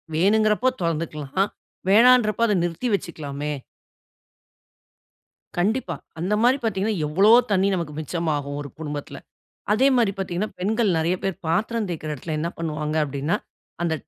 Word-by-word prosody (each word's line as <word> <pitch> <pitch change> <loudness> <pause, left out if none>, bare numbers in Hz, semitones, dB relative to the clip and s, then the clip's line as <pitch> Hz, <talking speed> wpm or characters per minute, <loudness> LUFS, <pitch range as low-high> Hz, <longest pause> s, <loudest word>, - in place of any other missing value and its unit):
வேணுங்கிறப்ப 215 +7 +3
தொறந்துக்கலாம், 165 +2 -1 0.4
வேணான்றப்ப 230 0 +5
அத 210 - +2
நிறுத்தி 175 +8 -2
வச்சுக்கிலாமே! 150 -4 -5 2.1
கண்டிப்பா. 190 - 0 0.2
அந்த 185 +5 -1
மாரி 255 +3 +5
பார்த்தீங்கன்னா, 215 0 0
எவ்ளோ 195 +8 +4 0.2
தண்ணீ 195 0 +3
நமக்கு 170 -4 -4
மிச்சமாகும் 150 -3 -2
ஒரு 145 - -7
குடும்பத்தில. 150 -2 -5 0.6
அதே 245 +6 +4
மாரி 225 -5 +3
பார்த்தீங்கன்னா, 190 +2 -2
பெண்கள் 215 +2 +1
நெறைய 170 +3 +1
பேர் 195 -3 -1
பாத்திரம் 215 +6 0
தேய்க்கற 155 -3 -4
இடத்தில 155 +3 -5
என்ன 165 +2 -1
பண்ணுவாங்க? 155 -1 -2
அப்டின்னா, 140 +3 -1 0.5
அந்த 165 -2 +1
175 Hz, 125 wpm, -23 LUFS, 155-215 Hz, 2.1 s, வேணான்றப்ப